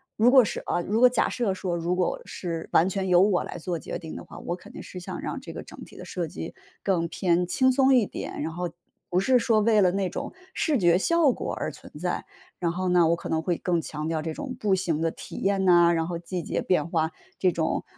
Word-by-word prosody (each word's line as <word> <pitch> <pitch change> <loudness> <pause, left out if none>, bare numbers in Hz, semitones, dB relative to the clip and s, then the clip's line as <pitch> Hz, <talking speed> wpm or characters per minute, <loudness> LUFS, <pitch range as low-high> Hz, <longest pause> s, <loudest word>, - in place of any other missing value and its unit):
如 225 +3 +5
果 260 -3 +7
是 185 - -3
呃 175 - +1
如 215 +5 0
果 250 - +8
假 245 - +2
设 235 -5 0
说 185 -2 -3
如 170 +1 -1
果 180 -1 0
是 165 -3 -5
完 170 - +5
全 190 0 -2
由 180 0 +6
我 195 -3 +2
来 - - -7
做 175 +1 -3
决 - - -5
定 160 -2 -8
的 - - -7
话， - - -12
我 175 - -3
肯 180 - -14
定 - - -9
是 180 - -8
想 175 - -6
让 - - -4
这 - - -8
个 - - -7
整 - - -11
体 - - -14
的 - - -8
设 175 -3 -3
计 80 - -7 0.3
更 175 -4 +1
偏 175 0 +1
轻 260 +8 +3
松 265 0 +4
一 240 -4 +4
点， - - -6
然 160 - -3
后 175 +1 -3 0.4
不 180 - +2
是 250 +6 +4
说 225 -2 +3
为 215 0 +4
了 180 - +4
那 195 0 -1
种 - - -5 0.2
视 305 -4 +1
觉 175 -2 +5
效 320 - +3
果 - - -4
而 - - -3
存 - - -13
在。 - - -2 0.3
然 170 -2 0
后 185 +2 -2
呢， 175 -2 +4
我 170 - +4
可 - - -7
能 160 - 0
会 170 +1 -1
更 175 -3 0
强 155 0 -5
调 160 -1 -1
这 160 0 -4
种 265 - -6
步 205 -2 +1
行 175 -5 0
的 165 0 +1
体 - - -9
验 195 -1 +1
呐， 175 -1 +6
然 165 -1 0
后 175 -1 -3
季 175 +1 -4
节 - - -2
变 170 -3 +1
化， 160 -1 0 0.3
这 185 - +3
种 160 -1 -1
180 Hz, 275 characters per minute, -26 LUFS, 170-200 Hz, 0.4 s, 果